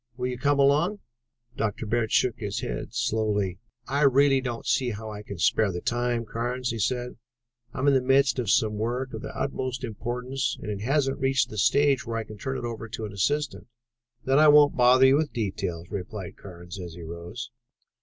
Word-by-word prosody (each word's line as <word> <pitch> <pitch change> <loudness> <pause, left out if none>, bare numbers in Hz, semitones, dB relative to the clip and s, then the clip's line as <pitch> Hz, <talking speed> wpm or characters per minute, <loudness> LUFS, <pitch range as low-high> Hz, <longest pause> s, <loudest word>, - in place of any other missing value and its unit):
"Will 125 - -2
you 125 -1 -2
come 145 +2 +2
along?" 150 +9 +3 0.6
Dr. 110 +1 -2
Bird 110 0 0
shook 120 -2 +2
his 100 -3 -3
head - - -4
slowly. 105 -4 0 0.3
"I 140 +3 0
really 140 -1 +5
don't 120 -3 -5
see 130 -2 +1
how 110 0 -6
I 105 -1 -7
can 100 -2 -8
spare 100 +4 +2
the 90 - -4
time, 120 +2 -1
Carnes," 120 +2 -2
he 115 - -4
said. 125 +3 -1 0.5
"I - - -11
am 130 - 0
in 140 - +6
the 130 - +4
midst 135 0 +3
of 120 -5 -2
some 105 0 +2
work 125 +4 -2
of - - -5
the - - -6
utmost 130 -2 -3
importance 125 +4 -3
and 105 - -5
it 100 -1 -5
hasn't 135 +3 +1
reached 135 -2 +1
the 105 - -7
stage 140 +4 +3
where 115 -1 -4
I 115 - -2
can 110 -1 -11
turn 130 -1 -3
it - - -5
over 115 -1 -5
to 110 +1 -5
an 105 - -7
assistant." 145 +9 -1 0.6
"Then 135 +2 +4
I 155 - +7
won't 150 -1 +7
bother 125 +1 +6
you 135 +1 +6
with 155 -1 -1
the 110 -5 -1
details," 85 -2 -5
replied 95 -1 -6
Carnes 90 0 -10
as 85 -2 -7
he 85 - -9
rose. 85 +8 -7
120 Hz, 210 wpm, -26 LUFS, 105-135 Hz, 0.6 s, I